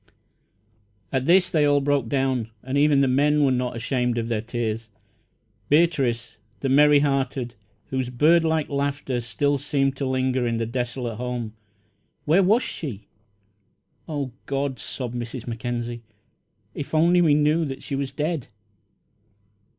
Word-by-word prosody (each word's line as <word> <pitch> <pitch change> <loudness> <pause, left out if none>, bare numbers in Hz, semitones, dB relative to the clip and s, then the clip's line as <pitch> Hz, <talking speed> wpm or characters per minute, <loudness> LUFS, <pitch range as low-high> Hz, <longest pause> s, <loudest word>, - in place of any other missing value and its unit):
At 130 0 -1
this 180 +1 +5
they 155 -2 +3
all 145 -1 +4
broke 140 -4 0
down, 130 -4 0
and 130 +2 -4
even 145 -1 +4
the 135 - +3
men 145 +3 +3
were 135 - +3
not 125 -1 -1
ashamed 125 +1 -1
of 115 0 -2
their 110 -2 0
tears. 115 -1 -3 0.8
Beatrice, 140 -8 +2 0.2
the 135 - 0
merry 145 +1 +6
hearted, 135 -3 -1 0.4
whose 130 -2 -1
birdlike 160 +4 +3
laughter 140 -3 -2
still 140 +5 0
seemed 135 -1 0
to 135 - -2
linger 130 -1 0
in 115 -1 -1
the 115 - -1
desolate 120 -1 -3
home 120 -2 -4 0.7
where 165 +6 +4
was 215 +6 +3
she? 110 - -6 1.0
"Oh, 145 -4 -3 0.2
God," 135 -1 -2
sobbed 125 -3 -5
Mrs. 120 0 -5
Mackenzie, 120 0 -4 0.7
"if 145 - -6
we 155 - +4
only 170 -2 +4
knew 150 +2 +3
that 135 -2 -6
she - - -6
was 135 -1 -2
dead!" 150 0 -2
135 Hz, 145 wpm, -24 LUFS, 120-145 Hz, 1.0 s, merry